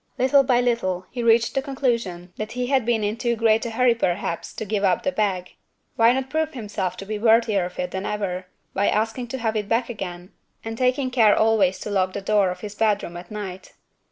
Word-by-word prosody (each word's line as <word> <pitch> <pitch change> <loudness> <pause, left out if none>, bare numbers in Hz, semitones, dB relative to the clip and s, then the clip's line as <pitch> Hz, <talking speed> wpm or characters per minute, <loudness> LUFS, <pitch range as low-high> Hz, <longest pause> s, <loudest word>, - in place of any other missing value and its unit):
Little 265 +2 +5
by 245 -2 +2
little, 185 -7 0
he 245 - -4
reached 230 0 +3
the 270 - +1
conclusion 235 -10 -2
that 215 0 -5
he 250 0 -2
had 260 -3 +1
been 230 -3 +1
in 210 +2 -1
too 235 0 0
great 225 -1 +3
a - - -3
hurry 240 +2 +3
perhaps 180 -5 -2
to 220 - -4
give 205 0 -1
up 185 -2 +2
the 280 - +1
bag. 195 -6 -1 0.4
Why 230 +1 +5
not 265 +1 -1
prove 315 0 -1
himself 205 -6 -3
to 195 - -7
be 210 +1 -4
worthier 220 -4 +3
of 180 - -9
it 180 - -3
than 190 +1 -3
ever, 185 -3 -3 0.3
by 200 +1 +1
asking 225 +3 -1
to 265 - -4
have 225 -3 -1
it 210 -2 -2
back 230 +2 +1
again, 180 -4 -7 0.3
and 225 0 -4
taking 255 +2 +1
care 225 -5 +5
always 215 -4 +3
to 210 - -5
lock 185 -2 +1
the 200 - -4
door 200 -1 +2
of 180 0 -6
his 205 -1 -6
bedroom 210 -5 0
at 175 0 -9
night? 195 -3 -7
220 Hz, 225 wpm, -23 LUFS, 190-240 Hz, 0.4 s, Little